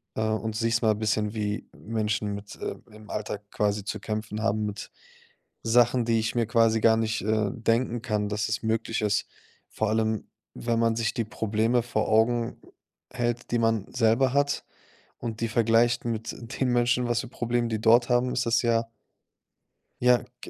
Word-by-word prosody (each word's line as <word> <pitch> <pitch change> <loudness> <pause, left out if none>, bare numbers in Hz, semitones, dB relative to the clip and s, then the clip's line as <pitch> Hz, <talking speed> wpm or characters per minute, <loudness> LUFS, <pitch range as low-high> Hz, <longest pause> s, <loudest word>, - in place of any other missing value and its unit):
und, 110 0 -1
äh, - - -2
siehst 115 0 +1
mal 110 -2 +3
bisschen, 105 0 0
wie 105 -1 -2
Menschen 105 -2 -2
mit 100 0 -9
äh, - - -4 0.2
im 105 0 -14
Alltag 105 -1 -5
quasi 105 -1 0
zu 110 - -4
kämpfen 110 0 -4
haben 110 -1 0
mit 105 -1 -5 0.7
Sachen, 120 +1 +3
die 115 -1 +2
ich 110 +2 -2
mir 115 -1 +2
quasi 115 -1 +3
gar 110 -1 +5
nicht, 110 0 -1
äh, 110 -2 +1
denken 115 +1 0
kann, 105 -4 -1
dass 105 0 -1
es 110 0 -2
möglich 110 0 -1
ist.“ 105 -1 +1 0.4
Vor 110 -1 -1
allem, 110 -1 0 0.3
wenn 115 -1 -1
man 115 -1 +2
sich 115 -1 0
die 115 - -1
Probleme 110 +2 0
vor 115 -3 -1
Augen 115 +2 +2 0.5
hält, 120 -1 -2
die 120 - +2
man 115 -3 +1
selber 120 +2 +3
hat 145 0 +1 0.6
und 115 -1 -5
die 115 - 0
vergleicht 115 +1 +3
mit 115 -1 -2 0.3
den 130 - +3
Menschen, 120 0 +2
was 120 0 +1
für 125 - -8
Probleme 120 -1 -1
die 110 -1 -2
dort 120 +2 +5
haben, 125 +1 +2
ist 125 - 0
das 115 +1 +3
ja 115 -1 +2 1.2
ja, 125 -1 +4 0.2
g - - -9
115 Hz, 180 wpm, -27 LUFS, 110-120 Hz, 1.2 s, gar